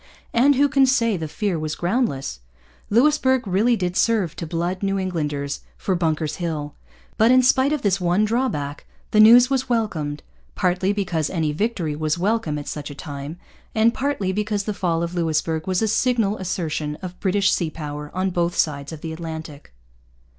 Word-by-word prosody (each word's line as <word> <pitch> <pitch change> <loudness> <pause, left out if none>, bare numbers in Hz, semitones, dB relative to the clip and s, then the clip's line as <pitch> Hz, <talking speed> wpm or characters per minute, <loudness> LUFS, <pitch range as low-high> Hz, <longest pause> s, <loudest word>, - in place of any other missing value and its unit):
And 275 +4 +5
who 285 +2 +4
can 275 -1 +4
say 230 -4 +2
the 160 -3 -4
fear 195 0 -2
was 155 -1 -3
groundless? 175 - -1 0.5
Louisbourg 260 +1 +3
really 210 +6 +3
did 180 -4 -2
serve 210 -7 +1
to 165 - -5
blood 175 +3 -2
New 195 0 0
Englanders 150 -7 -2 0.2
for 190 - -1
Bunker's 160 -3 -1
Hill. 155 -4 -3 0.5
But, 220 +2 +5
in 255 0 +6
spite 260 +2 +4
of 300 -3 -1
this 195 -2 +1
one 180 +4 +2
drawback, 210 - -2 0.2
the 215 - +3
news 240 +4 +8
was 265 -1 0
welcomed, 160 -11 -1 0.3
partly 185 +1 +1
because 180 -7 -1
any 160 -4 -1
victory 170 -3 -1
was 155 +1 -1
welcome 190 -5 0
at 145 - -7
such 150 -1 -5
a 145 - -8
time, 145 +2 -7 0.4
and 225 +1 +4
partly 260 -9 -1
because 210 +1 -1
the 210 - -3
fall 170 -4 -1
of 170 +1 -3
Louisbourg 160 -1 -1
was 185 +3 +1
a - - +2
signal 225 -2 +1
assertion 160 -5 -3
of 180 0 -7
British 195 0 +2
sea 170 -3 0
power 150 -1 -6
on 185 +1 -1
both 175 0 0
sides 145 -2 0
of 160 -2 -8
the 160 -1 -5
Atlantic. 160 - -8
180 Hz, 180 wpm, -22 LUFS, 155-220 Hz, 0.5 s, news